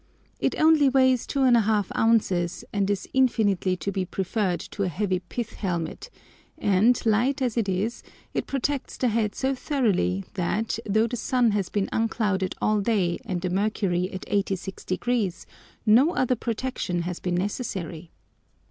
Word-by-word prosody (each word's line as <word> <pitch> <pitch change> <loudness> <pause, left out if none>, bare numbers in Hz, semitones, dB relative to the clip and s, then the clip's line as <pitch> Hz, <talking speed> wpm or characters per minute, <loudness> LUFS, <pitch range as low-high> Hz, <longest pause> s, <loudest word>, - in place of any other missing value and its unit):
It - - 0
only 310 -3 +5
weighs 260 -2 +3
2½ 225 -7 +2
ounces, 195 -6 +1
and 200 -1 +1
is 200 -2 -1
infinitely 205 -8 +2
to 200 - -3
be 190 -1 -1
preferred 190 0 -1
to 205 - -5
a 195 - +2
heavy 185 +2 -1
pith 210 +6 -5
helmet, 175 - -4 0.5
and, 205 +5 +3
light 240 +6 +2
as 250 -4 0
it 225 -4 0
is, 200 +6 -1 0.3
it - - -2
protects 275 0 -2
the 250 - +1
head 215 -2 0
so 265 +1 0
thoroughly, 205 - 0
that, 210 +5 -1
though 220 +2 +3
the 240 +1 -3
sun 240 0 +2
has 200 -3 -1
been 200 -2 -1
unclouded 205 -4 0
all 215 -1 +2
day 195 -5 +1
and 185 -6 -3
the 180 -1 -2
mercury 190 -2 0
at 190 - -6
86°, 195 +1 -2 0.4
no 255 +11 +5
other 255 0 +2
protection 225 -7 -2
has 175 0 -4
been 180 -1 -2
necessary. 180 -4 -3
210 Hz, 150 wpm, -25 LUFS, 185-240 Hz, 0.5 s, only